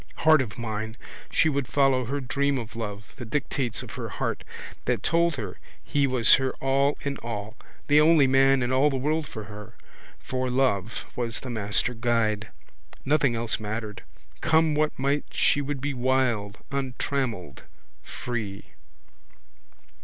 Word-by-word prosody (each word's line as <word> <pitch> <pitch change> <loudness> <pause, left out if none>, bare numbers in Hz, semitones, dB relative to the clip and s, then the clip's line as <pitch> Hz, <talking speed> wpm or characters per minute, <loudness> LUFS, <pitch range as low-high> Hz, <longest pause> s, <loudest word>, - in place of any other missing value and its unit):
Heart 155 -2 +7
of 120 -3 -5
mine! 110 -1 -4 0.3
She - - +3
would 140 -4 0
follow, 135 -3 +3
her 140 +5 -2
dream 140 +1 0
of 115 -2 -6
love, 105 -2 -6
the 130 - -6
dictates 125 -1 -2
of 120 - -9
her 125 -3 -5
heart - - -3 0.4
that - - 0
told 170 -1 +2
her 105 -8 -6 0.2
he 140 -1 +1
was 125 -3 +5
her 135 0 -1
all 135 +2 +1
in 140 -1 -3
all, 110 -2 -5 0.3
the 150 +1 +5
only 155 -2 +6
man 135 0 +4
in 125 - -1
all 135 +3 +4
the 135 - -1
world 150 +3 0
for 110 - -7
her 105 0 -10 0.4
for 130 0 -3
love 125 -5 0
was 115 -2 -3
the 130 - -5
master 110 +2 0
guide. 115 -3 0 0.6
Nothing 140 -3 +3
else 115 0 -1
mattered. 110 0 -4 0.4
Come 160 -1 +3
what 150 +1 +1
might 140 +2 0
she 145 - +2
would 145 0 -3
be 145 +1 -1
wild, 125 -5 +1
untrammelled, 130 - -2 0.4
free. 110 -5 -5
130 Hz, 155 wpm, -26 LUFS, 115-140 Hz, 0.6 s, Heart